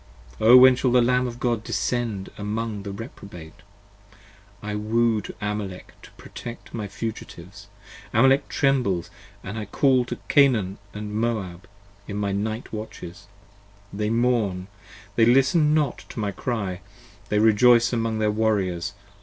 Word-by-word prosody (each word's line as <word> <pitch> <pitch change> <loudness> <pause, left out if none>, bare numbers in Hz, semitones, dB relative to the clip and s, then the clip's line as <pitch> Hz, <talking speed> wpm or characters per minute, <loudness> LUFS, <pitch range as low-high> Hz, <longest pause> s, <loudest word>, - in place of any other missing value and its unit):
15 110 - +1
O 125 +2 +10
when 130 0 +8
shall 125 0 0
the 125 - +5
Lamb 125 +1 +2
of 120 0 -7
God 120 -3 -1
descend 115 -5 -2
among 105 0 -4
the 100 0 -6
Reprobate? 100 -6 -10 1.0
1 105 +1 -5
woo 115 -1 +2
to - - -9
Amalek 105 -3 -5
to - - -14
protect 120 0 -10
my 110 -3 -4
fugitives, 100 -2 -8 0.4
Amalek 135 +2 +3
trembles: 125 -11 0 0.3
I 105 +3 -5
call 130 +4 +2
to - - -5
Canaan 115 -10 +3
& 100 - -28
Moab 105 -4 -3 0.4
in 100 - -5
my 100 -1 -1
night 110 +4 -3
watches, 105 -5 -8 0.7
they 105 +1 -2
mourn: 110 -6 0 0.5
They 115 - +6
listen 150 +5 +4
not 150 -5 0
to - - -7
my 105 -2 -1
cry, 100 -4 -3 0.5
they 105 - +1
rejoice 115 +3 +5
among 115 -1 -1
their 105 -1 +1
warriors. 100 -5 -1
110 Hz, 140 wpm, -24 LUFS, 100-120 Hz, 1.0 s, O